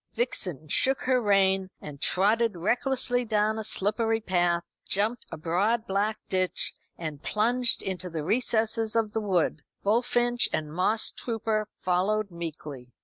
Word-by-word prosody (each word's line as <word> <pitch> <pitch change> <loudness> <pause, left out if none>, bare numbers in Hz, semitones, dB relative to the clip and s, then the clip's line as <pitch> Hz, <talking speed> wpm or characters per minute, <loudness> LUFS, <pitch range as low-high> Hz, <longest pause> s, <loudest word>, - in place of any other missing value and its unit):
Vixen 180 - -1
shook 265 - +4
her 255 -1 +2
rein 195 -2 +2
and 145 -2 -10
trotted 215 +3 +2
recklessly 245 +6 +1
down 215 -1 0
a - - -4
slippery 225 +3 0
path, 175 -4 0 0.2
jumped 215 +4 -1
a - - -6
broad 200 +9 0
black 205 +3 0
ditch, 185 -1 0 0.2
and 155 -4 -6
plunged 235 +6 +2
into 185 -1 -4
the 160 -3 -4
recesses 220 +2 +1
of 220 -2 0
the 220 - -1
wood, 180 -6 0 0.2
Bullfinch 240 +3 +2
and 155 -1 -2
Mosstrooper 220 +4 0
following 200 +4 0
meekly. 150 -6 -7
210 Hz, 135 wpm, -27 LUFS, 180-225 Hz, 0.2 s, shook